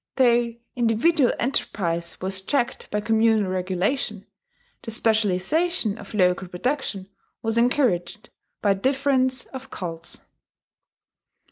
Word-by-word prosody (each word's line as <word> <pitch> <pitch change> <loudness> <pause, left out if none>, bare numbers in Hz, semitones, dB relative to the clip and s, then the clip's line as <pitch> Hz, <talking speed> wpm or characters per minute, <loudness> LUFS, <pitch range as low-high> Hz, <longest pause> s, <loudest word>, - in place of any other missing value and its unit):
Though 240 -2 +3 0.2
individual 245 +5 +3
enterprise 170 -9 -1
was 190 0 -1
checked 245 +5 -1
by 210 - -1
communal 220 -2 +2
regulation, 190 +4 -1 0.6
the - - -7
specialization 220 - +1
of - - -9
local 180 -1 +2
production 200 0 -2 0.4
was 225 0 0
encouraged 235 -6 +1 0.3
by 200 -2 +4
difference 260 +3 +1
of 265 0 -9
cults. 165 -6 -5
220 Hz, 100 wpm, -24 LUFS, 190-255 Hz, 0.6 s, by